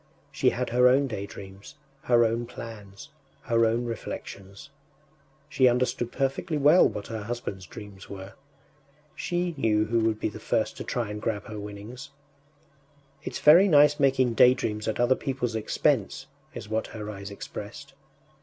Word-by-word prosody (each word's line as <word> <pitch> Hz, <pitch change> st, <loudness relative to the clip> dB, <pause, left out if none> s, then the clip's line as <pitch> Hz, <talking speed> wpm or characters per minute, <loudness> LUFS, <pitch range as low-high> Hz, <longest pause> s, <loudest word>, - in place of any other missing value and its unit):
She -, -, +2 dB
had 125 Hz, +1 st, -3 dB
her 125 Hz, +1 st, +5 dB
own 135 Hz, +3 st, +4 dB
daydreams, 100 Hz, -4 st, -8 dB, 0.3 s
her 120 Hz, -1 st, +4 dB
own 115 Hz, +1 st, -1 dB
plans, 115 Hz, +1 st, -10 dB, 0.3 s
her 115 Hz, -1 st, +3 dB
own 115 Hz, +2 st, 0 dB
reflections; 100 Hz, -1 st, -7 dB, 0.8 s
she 135 Hz, -4 st, +3 dB
understood 120 Hz, -1 st, 0 dB
perfectly 140 Hz, +4 st, -1 dB
well 150 Hz, +5 st, +6 dB
what 100 Hz, -, -6 dB
her 110 Hz, -2 st, -5 dB
husband’s 105 Hz, -5 st, -5 dB
dreams 100 Hz, +2 st, -11 dB
were. 95 Hz, 0 st, -9 dB, 0.8 s
She 175 Hz, -2 st, -2 dB
knew 110 Hz, -4 st, +2 dB
who 115 Hz, +2 st, +1 dB
would 110 Hz, -1 st, 0 dB
be -, -, -1 dB
the 105 Hz, -, -10 dB
first -, -, -1 dB
to -, -, -5 dB
try 120 Hz, -4 st, -3 dB
and 105 Hz, 0 st, -6 dB
grab 105 Hz, -3 st, -2 dB
her 105 Hz, -1 st, -7 dB
winnings. 105 Hz, +6 st, -9 dB, 1.1 s
“It’s -, -, -5 dB
very 170 Hz, +7 st, +7 dB
nice 150 Hz, -3 st, +5 dB
making 130 Hz, -3 st, +3 dB
daydreams 110 Hz, -3 st, +3 dB
at 110 Hz, -, -2 dB
other 120 Hz, +2 st, +4 dB
people’s 130 Hz, -3 st, -3 dB
expense!” 110 Hz, -1 st, 0 dB, 0.3 s
is -, -, -7 dB
what 110 Hz, +1 st, -2 dB
her 105 Hz, -2 st, -8 dB
eyes 100 Hz, -1 st, -8 dB
expressed. 105 Hz, +6 st, -9 dB
115 Hz, 155 wpm, -26 LUFS, 105-130 Hz, 1.1 s, very